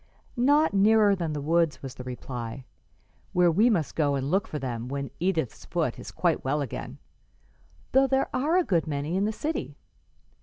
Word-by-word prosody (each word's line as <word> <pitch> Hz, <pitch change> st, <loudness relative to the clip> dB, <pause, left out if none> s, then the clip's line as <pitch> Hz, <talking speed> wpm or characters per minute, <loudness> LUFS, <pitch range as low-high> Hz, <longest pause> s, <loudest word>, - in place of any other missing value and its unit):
"Not 285 Hz, +3 st, +3 dB
nearer 205 Hz, 0 st, +5 dB
than 170 Hz, -4 st, -3 dB
the 150 Hz, -, -3 dB
woods," 165 Hz, 0 st, +1 dB
was 135 Hz, -2 st, -6 dB
the 125 Hz, -, -9 dB
reply, 125 Hz, 0 st, -6 dB, 0.7 s
"where 175 Hz, -1 st, +4 dB
we 210 Hz, +9 st, +4 dB
must 175 Hz, -, 0 dB
go 145 Hz, -3 st, +2 dB
and 135 Hz, +1 st, -2 dB
look 195 Hz, +1 st, +1 dB
for 150 Hz, -, -4 dB
them 125 Hz, -4 st, -4 dB
when 140 Hz, +1 st, -4 dB
Edith's 165 Hz, -, -1 dB
foot -, -, -2 dB
is -, -, -8 dB
quite -, -, 0 dB
well 145 Hz, +3 st, 0 dB
again, 140 Hz, -5 st, -5 dB, 0.9 s
though 270 Hz, +1 st, +5 dB
there 265 Hz, 0 st, +1 dB
are 300 Hz, +7 st, +2 dB
a 365 Hz, -, +4 dB
good 170 Hz, -, 0 dB
many 150 Hz, +3 st, -2 dB
in 195 Hz, +2 st, +1 dB
the 215 Hz, -, 0 dB
city. 305 Hz, +9 st, -4 dB
165 Hz, 185 wpm, -27 LUFS, 140-215 Hz, 0.9 s, nearer